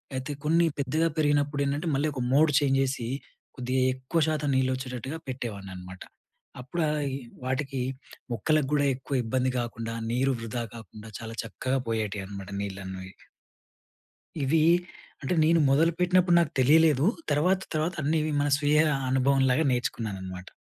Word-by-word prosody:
అయితే 130 +2 -4
కొన్ని 165 +2 +4
పెద్దగా 155 +4 +1
పెరిగినప్పుడు 145 -1 +2
ఏంటంటే, 145 +4 -1
మళ్ళీ 145 +3 +1
ఒక 130 - -4
మోడ్ 150 +2 +5
చేంజ్ 135 -2 +2
చేసి, 130 -3 -2 0.5
కొద్దిగా 130 +1 0
ఎక్కువ 130 +6 -1
శాతం 150 -2 0
నీళ్లు 130 0 +2
వచ్చేటట్టుగా 130 +4 -5
పెట్టేవాడిని 105 -7 -5
అనమాట. 90 0 -10 0.6
అప్పుడు 165 +7 -4
అయి 145 -3 -1 0.3
వాటికి 135 +1 -2 0.5
మొక్కలకు 145 +5 +1
గూడా 145 -1 +3
ఎక్కువ 135 +2 -5
ఇబ్బంది 130 +3 0
కాకుండా, 115 -1 -4 0.2
నీరు 130 +2 +2
వృధా 115 +1 -3
కాకుండా, 110 0 -11
చాలా 115 0 -7
చక్కగా 130 +4 -2
పోయేటివి 105 -3 -2
అనమాట 100 -1 -8
నీళ్ళన్నవి. 95 -1 -6 1.3
ఇవి, 155 +4 +3 0.6
అంటే 140 - 0
నేను 165 +1 +4
మొదలుపెట్టినప్పుడు 175 +4 +3
నాకు 165 -4 0
తెలియలేదు. 150 +2 +5 0.3
తర్వాత, 180 +6 +2
తర్వాత 155 +3 0
అన్నీ 155 +3 +1 0.2
మన 145 - +1
స్వీయ 150 0 +3 0.3
అనుభవంలాగా 135 +2 +3
నేర్చుకున్నాననమాట. 95 -7 -4
135 Hz, 135 wpm, -27 LUFS, 115-150 Hz, 1.3 s, మోడ్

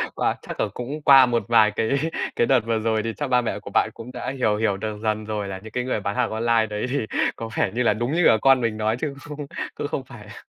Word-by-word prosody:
Wow, - - 0
chắc - - -8
là - - +1
cũng 140 +5 -5
qua 135 -2 +8
một 120 -2 0
vài 110 -3 +5
cái 110 +1 -1 0.5
cái 120 - +2
đợt 130 -2 +5
vừa 115 -1 0
rồi 110 -1 0
thì 115 -1 -3
chắc 145 - -2
ba 125 -1 +4
mẹ 115 - -3
của - - -10
bạn - - +3
cũng 120 +2 -10
đã 125 - -4
hiểu 115 -6 0
hiểu 105 -3 0
được 105 0 -5
dần 110 0 -1
rồi 105 -2 -3
là 95 -1 -5
những 110 - -10
cái 125 +1 -2
người 125 -4 -1
bán 100 0 -3
hàng - - +1
online 115 0 +2
đấy 105 +3 -3
thì 135 -3 -1 0.3
có 115 -1 -6
vẻ 95 - +1
như 125 +1 0
là - - +3
đúng 120 +4 -2
như 175 +1 +2
cả 110 - +6
con 135 -1 +5
mình 115 -2 -1
nói 110 +1 0
chứ 150 -3 -2 0.2
cũng 145 -1 -6 0.3
không 145 - -2
cũng 135 - -2
phải 120 -5 -13
là 105 - -12
115 Hz, 285 wpm, -23 LUFS, 110-130 Hz, 0.5 s, qua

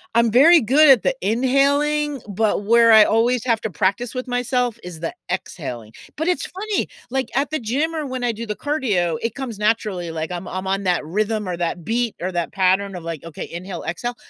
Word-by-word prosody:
I'm 235 -1 +4
very 315 +8 +7
good 280 +5 +5
at 255 -6 +6
the 265 - +1
inhaling, 280 +5 +1
but 205 0 0
where 230 +1 +5
I 220 -1 +8
always 235 +2 +1
have 230 -3 +1
to 220 - -3
practice 200 +7 -1
with 255 0 -5
myself 245 -1 -1
is 175 -3 -8
the 165 - -4 0.2
exhaling; 125 - -5 0.2
but 320 +3 -2
it's 360 - 0
funny, 410 +2 -3 0.2
like, 265 -2 -2
at 285 +2 0
the 310 - -1
gym 285 +9 -1
or 305 -2 -3
when 255 -2 -3
I 235 - 0
do 230 +2 -6
the 210 - -3
cardio, 205 - 0
it 230 -2 -2
comes 255 -6 -6
naturally, 210 -5 -1
like, 160 0 -4
I'm 180 0 -5
I'm 185 +1 -5
on 195 +1 -1
that 180 -4 0
rhythm 210 +3 -1
or 180 - -2
that 170 -1 -3
beat 235 0 -1
or 185 +1 -3
that 170 -1 -2
pattern 190 0 +1
of, 170 - -9
like, 165 -2 -6
"Okay, 165 -2 -8
inhale, 180 +2 -7
exhale." 240 +9 -3
225 Hz, 215 wpm, -21 LUFS, 185-260 Hz, 0.2 s, I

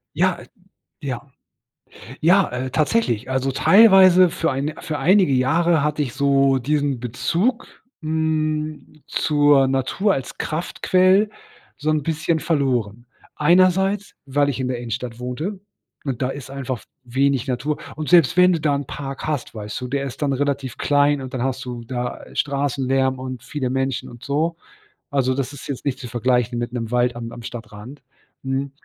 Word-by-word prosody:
Ja, - - +2
äh, - - -13 0.5
ja. 130 -4 -4 1.0
Ja, 185 +4 +4
äh, 130 +1 -3
tatsächlich. 145 - 0
Also 130 +1 0
teilweise 185 - +7
für 165 -1 -1
ein 140 +4 -2
für 150 -2 -4
einige 185 -5 +4
Jahre 160 +4 +2
hatte 150 0 0
ich 125 -5 -3
so 135 -1 +3
diesen 140 -1 0
Bezug, 170 - -1 0.3
hm, 155 -1 -2
zur 145 -3 +3
Natur 135 +10 +1
als 135 -2 -5
Kraftquelle 185 +5 +2 0.5
so 150 +1 -2
'n 155 -2 +1
bisschen 160 +1 0
verloren. 125 -8 -1 0.3
Einerseits, 185 +5 +3
weil 140 +1 +1
ich 135 - -3
in 130 - -1
der 125 -1 -2
Innenstadt 120 0 -5
wohnte, 155 +11 -4 0.5
und 135 -2 -3
da 130 - +1
ist 135 -1 -7
einfach 130 -3 -4
w - - -18 0.4
wenig 140 -1 +2
Natur. 130 +4 -1 0.2
Und 155 -1 -4
selbst 170 -2 +5
wenn 180 0 +6
du 165 - 0
da 145 -1 +2
'n 140 -1 -3
Park 135 -1 -6
hast, 150 -5 -3
weißt 105 0 -6
du, 125 - -4
der 140 +1 -2
ist 135 - -8
dann 140 -2 +1
relativ 140 -2 -2
klein 145 0 +2
und 130 -1 -8
dann 125 -1 -2
hast 130 0 -2
du 120 -1 -6
da, 125 0 -4
äh, - - -15
Straßenlärm 135 -2 0
und 130 -2 -6
viele 130 -4 -3
Menschen 135 0 -2
und 120 -1 -13
so, 155 +4 0 0.5
also 130 -3 +1
das 135 0 -3
ist 145 - -10
jetzt 140 -1 -5
nicht 135 -1 -1
zu 125 - -7
vergleichen 120 0 0
mit 120 0 -3
'nem 115 -2 -4
Wald 125 0 +1
am 115 -1 -6
am 120 - -9
Stadtrand, 115 +3 -9 0.4
hm, 135 +1 -2
140 Hz, 170 wpm, -21 LUFS, 125-155 Hz, 1.0 s, teilweise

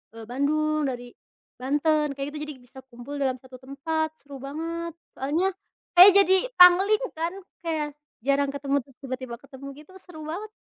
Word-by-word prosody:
eee, 225 - -9
Bandung, 305 +3 0
dari 245 -1 -5 0.5
Banten 295 +2 +1
kayak 275 +1 -4
gitu. 300 - -8
Jadi 300 - -7
bisa 260 +2 -14
kumpul 255 +3 -9
dalam 260 -2 -1
satu 260 -1 -13
tempat 310 +4 -3
seru 280 -1 -10
banget 330 +5 -5 0.2
soalnya, 315 +8 +1 0.5
kayak 370 +3 +11
jadi 380 0 +4 0.2
pangling 380 +4 +7 0.2
kan 335 +2 -2 0.3
kayak 300 -3 -2 0.2
jarang 275 +2 +1
ketemu 280 0 -1
terus 270 -3 -22
tiba-tiba 255 -3 -6
ketemu 275 0 -10
gitu 300 +5 -16
seru 355 -4 -13
banget. 365 +8 -6
285 Hz, 160 wpm, -26 LUFS, 270-320 Hz, 0.5 s, kayak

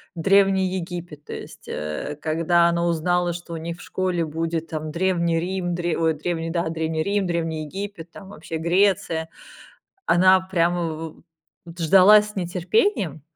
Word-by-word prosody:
Древний 195 +2 +3
Египет. 170 -4 -7
То - - -7
есть, - - -10
э, 75 - -4
когда 170 +2 +2
она 170 0 0
узнала, 175 +1 +1
что 170 0 -8
у - - -4
них 170 +2 -6
в - - -11
школе 180 -3 -1
будет, 165 +1 -3
там, 155 -1 -4
Древний 170 -1 +1
Рим, 180 0 -2
Древ 175 -1 -1
ой, 160 -1 +3
Древний 165 +1 -3
да, 170 -1 -1
Древний 160 -1 -2
Рим, 200 -1 0
Древний 165 -2 -2
Египет, 190 0 -7
там 195 +1 -12
вообще 165 -3 -6
Греция, 170 -2 +1 0.8
она 185 +2 +5
прямо 175 -2 0
в 160 0 -6 0.4
в - - -25
вот 170 +1 -11
ждала 195 +5 +7
с 210 0 -9
нетерпением. 180 - 0
170 Hz, 160 wpm, -23 LUFS, 160-185 Hz, 0.8 s, ждала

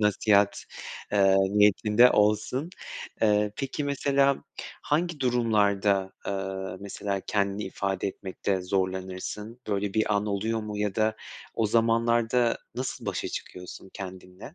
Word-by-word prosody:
nasihat, 105 -1 +3 0.5
ııı, 95 -1 +5 0.2
niyetinde 105 +4 +5
olsun. 110 +9 +1 0.5
Iıı, 105 -1 +3
peki, 135 +2 -3
mesela 140 -1 +2 0.4
hangi 160 0 0
durumlarda, 105 -6 +2
ııı, 95 -1 -3
mesela, 100 0 -3
kendini 100 0 0
ifade 95 0 -2
etmekte 95 0 -3
zorlanırsın? 95 +4 -3
Böyle, 100 -1 -1
bir 110 -1 +2
an 100 +1 0
oluyor 110 +3 -1
mu, 105 -1 -5
ya 105 -2 -1
da 110 0 +1 0.4
o 115 - +1
zamanlarda 115 +1 +2 0.2
nasıl 130 +2 -4
başa - - -2
çıkıyorsun 90 +1 -8
kendinle? 95 - -9
105 Hz, 115 wpm, -27 LUFS, 95-115 Hz, 0.5 s, ııı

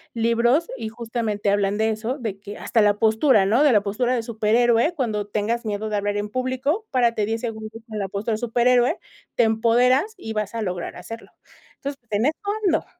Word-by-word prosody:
libros, 235 +7 +2
y 225 -4 -5
justamente 225 -3 -2
hablan 200 0 +1
de 220 +1 +2
eso, 220 +5 -3
de 220 -7 -5
que 205 +1 -9
hasta 225 - +1
la 205 -1 +4
postura, 220 0 +4
¿no?, 225 +8 +3
de 290 -5 +5
la 210 - +5
postura 240 +5 0
de 230 - -1
superhéroe, 235 +6 +2
cuando 215 -8 -2
tengas 220 +3 -2
miedo 215 0 -2
de 210 - -1
hablar 205 0 -1
en 205 0 -3
público, 260 - -1
párate 235 -5 +1
10 225 +1 -2
segundos 220 -1 -6
con 215 -1 -5
la 195 - -2
postura 205 +4 -3
de - - 0
superhéroe, 245 - +2 0.4
te 240 - +4
empoderas 245 - +3
y 225 -11 -6
vas 215 +1 -3
a 225 - -2
lograr 180 -3 -4
hacerlo, 225 +6 -9 0.5
entonces, 280 0 -6
en 210 +2 +1
eso 305 +3 0 0.3
ando. 345 -5 +2
225 Hz, 200 wpm, -23 LUFS, 210-245 Hz, 0.5 s, de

